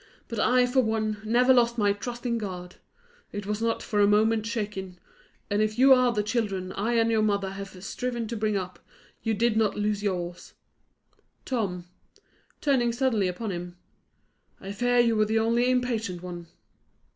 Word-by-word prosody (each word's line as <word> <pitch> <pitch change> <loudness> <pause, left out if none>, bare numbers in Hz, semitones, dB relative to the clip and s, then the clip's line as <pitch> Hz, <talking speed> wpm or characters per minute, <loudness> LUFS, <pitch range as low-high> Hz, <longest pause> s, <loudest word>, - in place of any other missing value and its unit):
But 230 -3 -5
I, 250 +2 +4
for 250 +2 +1
one, 220 -2 -1
never 245 +4 +4
lost 240 -1 +3
my 205 -2 +3
trust 240 +4 -7
in 235 -1 0
God; 180 -4 -7 0.5
it 205 -1 -5
was 210 +1 -3
not 230 0 0
for 210 - -1
a 205 - +5
moment 215 +1 +3
shaken; 205 -5 -4 0.5
and 205 0 0
if 215 +1 0
you 265 +2 +7
are 255 -1 +4
the 210 -3 0
children 205 -4 -2
I 220 +5 -1
and 230 -1 +3
your 220 -1 +2
mother 200 -2 0
have 195 -1 -9
striven 240 +2 -3
to 235 - -3
bring 215 -1 0
up, 185 -2 -5 0.4
you 225 -1 0
did 230 +1 +1
not 220 -2 +1
lose 210 0 0
yours. 180 -3 -4 0.9
Tom," 195 -9 -2 0.8
turning 260 -5 +2
suddenly 235 -5 +1
upon 200 +4 -3
him, 175 0 -6 0.8
"I 195 - -7
fear 245 +4 +1
you 235 -2 +4
were 215 0 +3
the 220 +1 0
only 235 +2 +2
impatient 225 -8 -1
one." 175 -1 -7
215 Hz, 175 wpm, -27 LUFS, 200-235 Hz, 0.9 s, you